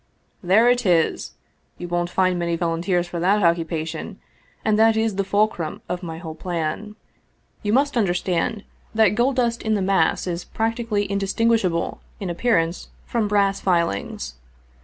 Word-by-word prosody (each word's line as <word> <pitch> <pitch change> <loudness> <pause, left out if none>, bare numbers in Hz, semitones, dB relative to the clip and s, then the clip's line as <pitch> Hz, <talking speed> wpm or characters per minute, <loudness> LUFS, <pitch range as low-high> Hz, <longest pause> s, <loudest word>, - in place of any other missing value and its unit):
" - - -40
There 225 +5 +6
it 245 0 +3
is! 175 -5 +1 0.4
You 175 - -6
won't 175 0 -1
find 185 -1 +1
many 170 -1 0
volunteers 175 +1 0
for 175 0 -5
that 195 +4 +2
occupation, 165 -1 -1 0.5
and 215 -1 +2
that 225 0 +5
is 220 -1 +1
the 195 - 0
fulcrum 200 -5 0
of 180 0 -3
my 165 -3 -6
whole 165 -1 -7
plan. 175 +5 -4 0.7
You 205 - -1
must 280 +2 +2
understand 195 +1 0 0.3
that 220 -2 +5
gold 245 +5 +2
dust 235 -2 0
in 220 -1 0
the - - 0
mass 195 0 +2
is 175 -1 -3
practically 225 -2 -1
indistinguishable 200 -2 0 0.2
in 190 -4 -3
appearance 170 -3 0 0.2
from 230 -3 0
brass 200 -1 +2
filings. 100 - -1
190 Hz, 155 wpm, -22 LUFS, 170-220 Hz, 0.7 s, There